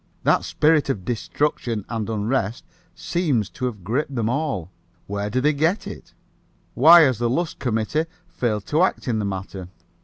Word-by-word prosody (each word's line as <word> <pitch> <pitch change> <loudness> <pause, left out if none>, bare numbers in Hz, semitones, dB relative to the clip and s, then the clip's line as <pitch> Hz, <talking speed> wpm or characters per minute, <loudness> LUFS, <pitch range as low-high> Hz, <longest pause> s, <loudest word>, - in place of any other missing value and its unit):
That - - +3
spirit 150 -2 +2
of 100 -9 -2
destruction 120 -2 -2
and 115 -2 -3
unrest 110 +1 -1 0.3
seems 145 - -1
to 125 - -4
have 110 -7 -4
gripped 130 - -2
them 115 -2 0
all. 130 - -2 0.3
Where 100 +1 -3
do 125 +5 0
they 150 +3 +3
get 160 +8 0
it? - - -10 0.6
Why 165 +6 +8
has 130 -7 +3
the 120 -1 +1
Lusk 165 +7 -2
committee 120 +6 0 0.2
failed 105 -5 -2
to 155 +3 +1
act 185 - +1
in 115 -3 0
the 105 - -1
matter? 95 -1 -5
120 Hz, 165 wpm, -23 LUFS, 105-150 Hz, 0.6 s, Why